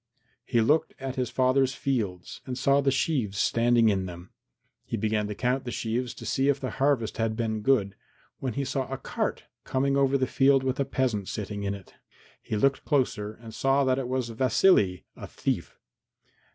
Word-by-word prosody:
He 120 Hz, -, +1 dB
looked 150 Hz, +8 st, +2 dB
at 135 Hz, -1 st, -4 dB
his 125 Hz, -3 st, -1 dB
father's 130 Hz, +1 st, +2 dB
fields 105 Hz, -10 st, -3 dB
and 125 Hz, -1 st, -4 dB
saw 140 Hz, +2 st, +3 dB
the 140 Hz, -, +2 dB
sheaves 130 Hz, -7 st, 0 dB
standing 115 Hz, +1 st, +3 dB
in 95 Hz, -2 st, 0 dB
them. 90 Hz, 0 st, -10 dB, 0.5 s
He 115 Hz, -, -4 dB
began 105 Hz, 0 st, 0 dB
to 105 Hz, -, -5 dB
count 130 Hz, +4 st, 0 dB
the 125 Hz, -, -5 dB
sheaves 120 Hz, +2 st, -2 dB
to -, -, -9 dB
see 135 Hz, +1 st, +1 dB
if 140 Hz, -1 st, +2 dB
the 130 Hz, -, -4 dB
harvest 135 Hz, -6 st, 0 dB
had 115 Hz, -1 st, 0 dB
been 110 Hz, -2 st, -2 dB
good, 105 Hz, -5 st, +2 dB, 0.5 s
when 130 Hz, -3 st, -3 dB
he 140 Hz, +3 st, -2 dB
saw 135 Hz, 0 st, -2 dB
a 135 Hz, -, -2 dB
cart -, -, -3 dB, 0.2 s
coming 135 Hz, +1 st, 0 dB
over 140 Hz, 0 st, +3 dB
the 130 Hz, -, +1 dB
field 135 Hz, +1 st, +3 dB
with 130 Hz, 0 st, -1 dB
a 140 Hz, -, +2 dB
peasant 125 Hz, -7 st, -1 dB
sitting 105 Hz, -1 st, -4 dB
in 100 Hz, 0 st, -2 dB
it. 100 Hz, -2 st, -14 dB, 0.5 s
He 110 Hz, -, -3 dB
looked 135 Hz, +5 st, +2 dB
closer 120 Hz, -8 st, 0 dB
and 115 Hz, -1 st, -12 dB
saw 135 Hz, +3 st, +2 dB
that 130 Hz, 0 st, +2 dB
it 130 Hz, -, -3 dB
was 130 Hz, -2 st, -1 dB
Vasily, 115 Hz, -, +3 dB
a -, -, -8 dB
thief. -, -, -3 dB
125 Hz, 190 wpm, -27 LUFS, 110-135 Hz, 0.5 s, saw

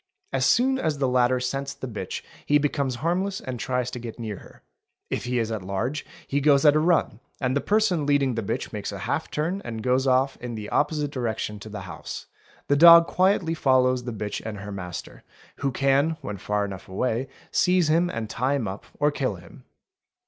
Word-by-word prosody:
As 130 Hz, -1 st, +2 dB
soon 265 Hz, +2 st, +3 dB
as 155 Hz, -, 0 dB
the 135 Hz, -1 st, +1 dB
latter 125 Hz, 0 st, +3 dB
scents 135 Hz, +2 st, -3 dB
the 130 Hz, -, -6 dB
bitch 110 Hz, -4 st, -5 dB, 0.2 s
he 145 Hz, -, +5 dB
becomes 140 Hz, -3 st, 0 dB
harmless 190 Hz, +3 st, 0 dB
and 125 Hz, -2 st, -6 dB
tries 125 Hz, 0 st, -1 dB
to 125 Hz, -, -5 dB
get 115 Hz, -1 st, -7 dB
near 110 Hz, -4 st, -5 dB
her; -, -, -16 dB, 0.5 s
if -, -, -2 dB
he 125 Hz, 0 st, -1 dB
is 115 Hz, -1 st, 0 dB
at 110 Hz, -3 st, -3 dB
large 105 Hz, +10 st, -3 dB, 0.2 s
he 140 Hz, +1 st, -1 dB
goes 140 Hz, 0 st, +4 dB
at 150 Hz, 0 st, +7 dB
a -, -, +4 dB
run 160 Hz, -9 st, +2 dB, 0.2 s
and 130 Hz, 0 st, 0 dB
the 140 Hz, -, +1 dB
person 200 Hz, -8 st, +2 dB
leading 140 Hz, -3 st, +3 dB
the 115 Hz, -, -2 dB
bitch 100 Hz, -, -3 dB
makes -, -, -4 dB
a -, -, -6 dB
half -, -, -2 dB
turn 170 Hz, +6 st, -2 dB
and 115 Hz, -6 st, -5 dB
goes 130 Hz, +1 st, +2 dB
off 130 Hz, +1 st, +2 dB
in 120 Hz, -1 st, -6 dB
the 105 Hz, -1 st, -6 dB
opposite 145 Hz, -1 st, 0 dB
direction 110 Hz, -5 st, -3 dB
to 110 Hz, -, -9 dB
the 105 Hz, -1 st, -6 dB
house; 85 Hz, -4 st, -7 dB, 0.4 s
the 145 Hz, -, +3 dB
dog 170 Hz, +2 st, +9 dB
quietly 185 Hz, -2 st, +2 dB
follows 130 Hz, -4 st, +3 dB
the 125 Hz, -, -3 dB
bitch 105 Hz, -2 st, -4 dB
and 110 Hz, -2 st, -5 dB
her 100 Hz, +1 st, -7 dB
master, 90 Hz, -3 st, -7 dB, 0.4 s
who 140 Hz, -1 st, -1 dB
can 140 Hz, +5 st, +2 dB
when 105 Hz, -7 st, -5 dB
far 105 Hz, +2 st, -1 dB
enough 95 Hz, -2 st, -8 dB
away 120 Hz, +6 st, -1 dB, 0.2 s
seize 180 Hz, -2 st, +3 dB
him 170 Hz, +3 st, +3 dB
and 115 Hz, -5 st, -4 dB
tie 130 Hz, +5 st, 0 dB
him 125 Hz, -6 st, -1 dB
up 95 Hz, +2 st, -7 dB
or 150 Hz, 0 st, +3 dB
kill 130 Hz, -7 st, -1 dB
him. 85 Hz, -1 st, -15 dB
130 Hz, 210 wpm, -25 LUFS, 110-150 Hz, 0.5 s, dog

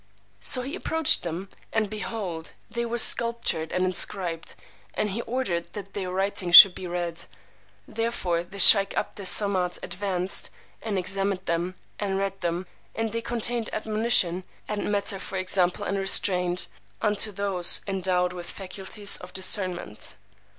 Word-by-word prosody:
So 250 Hz, -, +4 dB
he 275 Hz, +4 st, -7 dB
approached 320 Hz, -5 st, +2 dB
them, 175 Hz, +3 st, -7 dB, 0.2 s
and 220 Hz, -1 st, -1 dB
behold, 200 Hz, -6 st, -6 dB, 0.2 s
they 235 Hz, 0 st, -4 dB
were 235 Hz, +1 st, -4 dB
sculptured 230 Hz, -9 st, +4 dB
and 185 Hz, 0 st, -1 dB
inscribed; 180 Hz, -2 st, -2 dB, 0.4 s
and 210 Hz, -, -2 dB
he 225 Hz, +5 st, -4 dB
ordered 225 Hz, -10 st, -4 dB
that 200 Hz, -2 st, -10 dB
their 190 Hz, -3 st, -5 dB
writing 190 Hz, -1 st, -2 dB
should 185 Hz, +1 st, +11 dB
be 185 Hz, -, -9 dB
read: 175 Hz, -1 st, -5 dB, 0.6 s
therefore 220 Hz, -7 st, -3 dB
the 190 Hz, +3 st, -13 dB
sheykh 195 Hz, 0 st, +8 dB
Abd -, -, -5 dB
Es 190 Hz, -, +2 dB
Samad 185 Hz, -4 st, +1 dB
advanced 185 Hz, 0 st, -3 dB, 0.3 s
and 215 Hz, -3 st, -4 dB
examined 195 Hz, +1 st, -3 dB
them 170 Hz, +2 st, -3 dB, 0.2 s
and 195 Hz, -2 st, -3 dB
read 195 Hz, 0 st, -5 dB
them; 175 Hz, +1 st, -4 dB, 0.3 s
and 225 Hz, -1 st, -3 dB
they 230 Hz, +1 st, -4 dB
contained 235 Hz, 0 st, -2 dB
admonition, 215 Hz, -5 st, 0 dB, 0.2 s
and 210 Hz, -1 st, -4 dB
matter 200 Hz, -1 st, -1 dB
for 190 Hz, -, -7 dB
example 185 Hz, +1 st, -2 dB
and 200 Hz, 0 st, -3 dB
restraint, 180 Hz, -2 st, +4 dB, 0.3 s
unto 210 Hz, 0 st, -1 dB
those 195 Hz, -3 st, +3 dB
endowed 185 Hz, -2 st, -2 dB
with 175 Hz, -1 st, -9 dB
faculties 200 Hz, +2 st, -1 dB
of 180 Hz, -, -13 dB
discernment. 185 Hz, -, +2 dB
195 Hz, 145 wpm, -24 LUFS, 180-210 Hz, 0.6 s, should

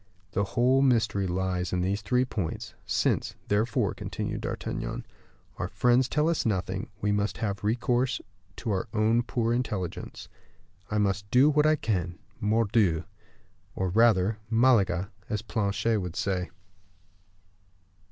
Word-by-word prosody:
The 100 Hz, -, +1 dB
whole 130 Hz, +2 st, +4 dB
mystery 115 Hz, -7 st, +2 dB
lies 90 Hz, -1 st, -1 dB
in 90 Hz, -, 0 dB
these 100 Hz, +3 st, 0 dB
three 125 Hz, +6 st, +2 dB
points. 100 Hz, -10 st, -4 dB
Since, -, -, 0 dB
therefore," 105 Hz, +2 st, +1 dB
continued -, -, -4 dB
D'Artagnan, -, -, -4 dB, 0.5 s
"our -, -, -2 dB
friends 125 Hz, +1 st, +2 dB
tell 150 Hz, +2 st, +2 dB
us 170 Hz, -1 st, +1 dB
nothing, 95 Hz, -1 st, -2 dB
we 105 Hz, -, +1 dB
must 105 Hz, 0 st, 0 dB
have 100 Hz, -3 st, -3 dB
recourse 120 Hz, +3 st, +1 dB, 0.4 s
to 115 Hz, -, -3 dB
our 95 Hz, -2 st, -1 dB
own 110 Hz, +2 st, +3 dB
poor 120 Hz, -1 st, 0 dB
intelligence. 105 Hz, -8 st, -3 dB, 0.6 s
I 105 Hz, -, -1 dB
must 100 Hz, 0 st, 0 dB
do 130 Hz, +7 st, +5 dB
what 150 Hz, +1 st, +4 dB
I 155 Hz, -, +5 dB
can, 90 Hz, -, -2 dB, 0.2 s
mordioux, 105 Hz, -5 st, +2 dB, 0.7 s
or 95 Hz, -1 st, -1 dB
rather 105 Hz, 0 st, +3 dB
Malaga, 110 Hz, -6 st, +3 dB, 0.2 s
as 105 Hz, -1 st, -2 dB
Planchet 105 Hz, 0 st, 0 dB
would 90 Hz, -2 st, -5 dB
say." 95 Hz, -2 st, -1 dB
105 Hz, 135 wpm, -28 LUFS, 95-120 Hz, 0.7 s, do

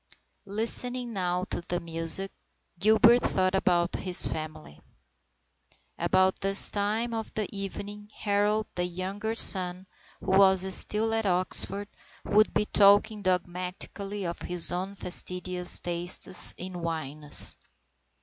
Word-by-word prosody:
Listening 235 Hz, +4 st, -4 dB
now 180 Hz, -2 st, -3 dB
to -, -, -1 dB
the 175 Hz, -, -2 dB
music, 165 Hz, +3 st, 0 dB, 0.5 s
Gilbert 220 Hz, +4 st, +4 dB
thought 185 Hz, 0 st, -1 dB
about 175 Hz, -2 st, 0 dB
his 185 Hz, -2 st, +3 dB
family. 155 Hz, -, -8 dB, 1.2 s
About 185 Hz, 0 st, 0 dB
this 195 Hz, 0 st, +7 dB
time 215 Hz, +3 st, -2 dB
of 225 Hz, -1 st, -6 dB
the 215 Hz, -2 st, -3 dB
evening 205 Hz, +1 st, -8 dB
Harold, 210 Hz, +1 st, -1 dB
the 175 Hz, -, -3 dB
younger 190 Hz, +5 st, -5 dB
son, 185 Hz, -4 st, +7 dB, 0.3 s
who -, -, -5 dB
was 190 Hz, -1 st, +3 dB
still 220 Hz, +4 st, 0 dB
at 225 Hz, -2 st, -2 dB
Oxford, 185 Hz, +2 st, -1 dB, 0.4 s
would 215 Hz, +1 st, +2 dB
be 210 Hz, -, -1 dB
talking 205 Hz, +1 st, +2 dB
dogmatically 185 Hz, +2 st, -5 dB
of 170 Hz, 0 st, -6 dB
his 175 Hz, -1 st, -2 dB
own 185 Hz, +3 st, -5 dB
fastidious 180 Hz, -1 st, -1 dB
tastes 175 Hz, +1 st, +1 dB
in 180 Hz, -1 st, -7 dB
wines. 155 Hz, -3 st, -1 dB
190 Hz, 120 wpm, -26 LUFS, 180-205 Hz, 1.2 s, this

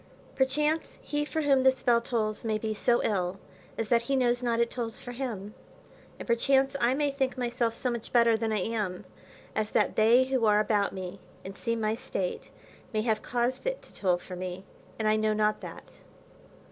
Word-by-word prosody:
Perchance 300 Hz, +4 st, 0 dB
he 295 Hz, 0 st, -1 dB
for 315 Hz, +1 st, -2 dB
whom 275 Hz, -2 st, +4 dB
this 260 Hz, 0 st, +3 dB
bell 235 Hz, -2 st, +4 dB
tolls 215 Hz, -3 st, -1 dB
may 220 Hz, -2 st, 0 dB
be 220 Hz, 0 st, -2 dB
so 240 Hz, +3 st, +2 dB
ill, 190 Hz, -2 st, -1 dB, 0.4 s
as 225 Hz, -, -2 dB
that 235 Hz, -1 st, +4 dB
he 270 Hz, +4 st, -1 dB
knows 245 Hz, -1 st, +2 dB
not 235 Hz, -1 st, 0 dB
it 235 Hz, 0 st, +2 dB
tolls 230 Hz, -3 st, -4 dB
for 245 Hz, -, -8 dB
him; 225 Hz, -5 st, -5 dB, 0.6 s
and -, -, -8 dB
perchance 270 Hz, +3 st, +3 dB
I 240 Hz, +2 st, +3 dB
may 290 Hz, 0 st, +1 dB
think 270 Hz, -2 st, -1 dB
myself 240 Hz, -2 st, -1 dB
so 250 Hz, +1 st, -1 dB
much 235 Hz, -2 st, -5 dB
better 235 Hz, -2 st, +5 dB
than 220 Hz, 0 st, -1 dB
I 210 Hz, -3 st, 0 dB
am, 205 Hz, -3 st, -2 dB, 0.5 s
as 215 Hz, -1 st, 0 dB
that -, -, +1 dB
they 230 Hz, +4 st, +6 dB
who 260 Hz, -3 st, 0 dB
are 210 Hz, 0 st, +5 dB
about 210 Hz, -2 st, +2 dB
me, 190 Hz, 0 st, -6 dB, 0.3 s
and 195 Hz, +1 st, -7 dB
see 230 Hz, +2 st, -2 dB
my 215 Hz, -1 st, 0 dB
state, 220 Hz, -6 st, -4 dB, 0.4 s
may 215 Hz, -2 st, 0 dB
have 220 Hz, -2 st, +1 dB
caused 245 Hz, -, -1 dB
it -, -, -2 dB
to -, -, -14 dB
toll 180 Hz, -3 st, +1 dB
for 180 Hz, +1 st, -9 dB
me, 185 Hz, +1 st, -6 dB, 0.3 s
and 220 Hz, -, 0 dB
I 215 Hz, 0 st, +4 dB
know 215 Hz, 0 st, +2 dB
not 215 Hz, 0 st, +1 dB
that. -, -, -10 dB
230 Hz, 200 wpm, -29 LUFS, 215-255 Hz, 0.6 s, they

